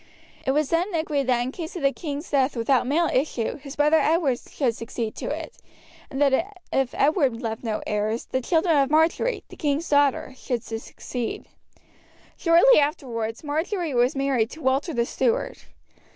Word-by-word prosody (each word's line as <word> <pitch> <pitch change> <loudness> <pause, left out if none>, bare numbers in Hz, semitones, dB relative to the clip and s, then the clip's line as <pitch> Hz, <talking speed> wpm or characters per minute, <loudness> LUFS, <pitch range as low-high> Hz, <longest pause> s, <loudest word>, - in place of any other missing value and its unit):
It - - +2
was 300 0 0
then 345 +3 +1
agreed 300 -4 -1
that 245 -2 +2
in 250 +2 -2
case 325 +3 -7
of 340 - -5
the 275 - +4
king's 295 -1 -6
death 275 -1 +2
without 245 +2 +2
male 320 +5 +2
issue 255 -3 -1
his 280 0 -10
brother 300 +2 +4
Edward 300 -6 +2
should 245 -6 -2
succeed 230 -1 -4
to - - -5
it, - - -5 0.5
and 270 - -5
that 290 +8 +1 0.2
if 270 -2 0
Edward 275 -5 +2
left 225 -2 -4
no 220 -2 -2
heirs, 210 +2 -1
the 260 - -2
children 325 +4 +2
of 275 -2 +3
Marjory, 320 +10 +2
the - - -11
king's 295 +1 -1
daughter, 285 -2 +2
should 245 -3 -3
succeed. 230 +1 -5 0.9
Shortly 340 +8 +6
afterwards 235 -6 -2
Marjory 320 +2 -2
was 245 +3 +2
married 270 -5 +1
to 320 - -11
Walter 270 +6 +1
the 235 -5 0
Steward. 475 - -1
275 Hz, 170 wpm, -24 LUFS, 245-315 Hz, 0.9 s, Shortly